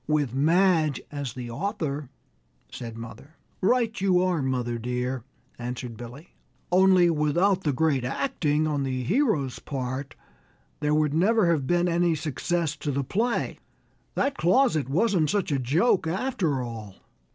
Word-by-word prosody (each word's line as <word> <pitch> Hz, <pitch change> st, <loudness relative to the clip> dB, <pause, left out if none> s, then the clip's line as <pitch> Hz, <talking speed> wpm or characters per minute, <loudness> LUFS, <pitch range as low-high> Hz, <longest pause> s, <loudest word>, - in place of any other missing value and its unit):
"With 150 Hz, -5 st, +1 dB
Madge 160 Hz, +1 st, +3 dB
as 140 Hz, -5 st, -4 dB
the 125 Hz, -2 st, -6 dB
author," 150 Hz, -, -3 dB, 0.6 s
said 115 Hz, -2 st, -7 dB
mother. 115 Hz, +7 st, -10 dB, 0.3 s
"Right 230 Hz, +1 st, +1 dB
you 185 Hz, -2 st, +3 dB
are, 180 Hz, -4 st, +1 dB
mother 125 Hz, -3 st, -1 dB
dear," 125 Hz, +1 st, -2 dB, 0.4 s
answered 125 Hz, 0 st, -5 dB
Billy, 120 Hz, +8 st, -11 dB, 0.4 s
"only 185 Hz, -1 st, +5 dB
without 175 Hz, +6 st, +2 dB
the 150 Hz, -, 0 dB
great 140 Hz, -2 st, +1 dB
acting 155 Hz, -, 0 dB
on 150 Hz, -2 st, 0 dB
the 130 Hz, -1 st, -2 dB
hero's 165 Hz, -, +1 dB
part 130 Hz, 0 st, -5 dB, 0.6 s
there 150 Hz, 0 st, +1 dB
would 150 Hz, -1 st, +2 dB
never 190 Hz, +2 st, +3 dB
have 145 Hz, -5 st, 0 dB
been 175 Hz, 0 st, +2 dB
any 170 Hz, -1 st, +2 dB
success 155 Hz, +1 st, -2 dB
to 145 Hz, -, -4 dB
the 140 Hz, 0 st, 0 dB
play. 230 Hz, -, -1 dB, 0.6 s
That 275 Hz, -, 0 dB
closet 175 Hz, -, +3 dB
wasn't 180 Hz, -1 st, +2 dB
such 200 Hz, -5 st, 0 dB
a 140 Hz, -, +1 dB
joke 160 Hz, -, +2 dB
after 170 Hz, -, -1 dB
all!" 110 Hz, -5 st, -7 dB
150 Hz, 140 wpm, -26 LUFS, 130-180 Hz, 0.6 s, only